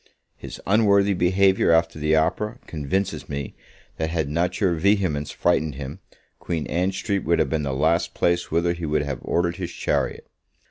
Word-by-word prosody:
His - - -9
unworthy 100 -1 +4
behaviour 95 +1 +3
after 80 -1 +2
the 75 +1 +2
opera, 80 +7 0
convinces 80 +1 -3
me, 70 -2 -4 0.4
that, 80 0 -1
had 80 -4 -1
not 85 +6 -1
your 95 -5 +2
vehemence 85 -4 +1
frightened 75 -3 0
him, 70 -1 -7 0.4
Queen 80 -3 -3
Ann 90 +2 0
Street 100 +1 -2
would 85 +2 +2
have - - +1
been 80 -1 0
the 70 -2 -2
last 80 +6 +1
place 85 0 +1
whither 85 +2 +1
he 85 -2 -5
would 75 0 +1
have 70 -4 -4
ordered 85 +1 0
his 90 -3 -4
chariot. - - -2
85 Hz, 175 wpm, -23 LUFS, 75-95 Hz, 0.4 s, unworthy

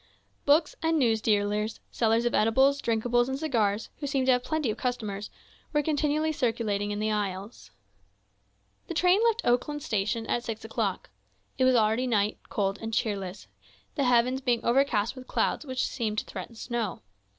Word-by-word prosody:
Book 295 +2 +4
and 325 0 +2
news 230 -6 +2
dealers, 210 0 0
sellers 230 0 +2
of 240 - +1
edibles, 265 +6 +3
drinkables, 240 +2 +1
and 265 - -2
cigars, 225 -8 0
who 290 - -4
seemed 270 -2 0
to 260 - +5
have 250 0 0
plenty 305 -4 -1
of - - -6
customers, 215 -5 -3 0.4
were 295 0 +2
continually 305 +1 +1
circulating 225 -7 -1
in 205 - -2
the 215 +1 0
aisles. 200 - -4 1.2
The 340 - -5
train 360 +5 +4
left 465 0 +2
Oakland 280 +4 +1
station 215 +2 -1
at 240 - -1
six 225 -2 -5
o'clock. 225 - -2 0.5
It 260 - +4
was 255 0 +5
already 225 +3 +2
night, 210 -3 +1
cold 195 -1 -1
and 225 0 -4
cheerless, 195 - -2 0.5
the 280 - 0
heavens 250 +2 +3
being 245 -3 0
overcast 235 -3 +2
with 255 -1 -10
clouds 305 - 0
which 255 -1 -1
seemed 215 -3 -2
to - - -1
threaten 230 - -8
snow. 225 - -3
235 Hz, 170 wpm, -28 LUFS, 215-270 Hz, 1.2 s, to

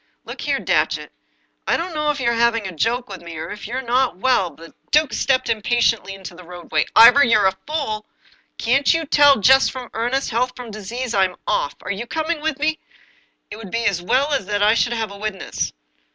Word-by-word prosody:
" - - -48
Look - - -8
here, - - -1
Datchet, - - 0 0.6
I - - +2
don't 345 +1 -4
know 300 -1 -1
if 295 -1 -1
you're 235 -2 +1
having 230 -2 +1
a - - -6
joke 240 +8 -1
with 195 -2 -9
me, 170 -2 -9
or 155 - -6
if 205 - -8
you're 255 +3 -4
not 250 -3 +1
well 195 -4 +2
" - - -21
The 165 0 -14 0.2
duke 305 0 +2
stepped 260 -1 +1
impatiently 230 -2 0
into 190 -2 -10
the 180 +1 -13
roadway. 175 -3 -2
" - - -48
Ivor, 260 +5 +8
you're 215 -5 +3
a 190 0 +2
fool! 250 -9 -3 0.5
Can't 270 +4 +2
you 330 0 -1
tell 285 -1 +5
jest 265 +6 +5
from 255 -2 -8
earnest, 245 +5 -1
health 250 +3 0
from 245 -3 -9
disease? 230 +4 -5
I'm 190 -2 +1
off 145 - -1
I - - -7
Are - - +1
you 210 +4 -5
coming 320 +1 -2
with 310 -2 -2
me? 315 +2 -1 0.7
It 210 - -7
would 220 -3 -9
be 230 +4 -2
as 195 -5 +1
well 275 +10 +1
that 205 +1 -1
I 210 +1 +5
should 240 +1 +1
have 220 -3 -3
a 200 - -10
witness." 210 -2 -4
235 Hz, 225 wpm, -20 LUFS, 200-265 Hz, 0.7 s, Ivor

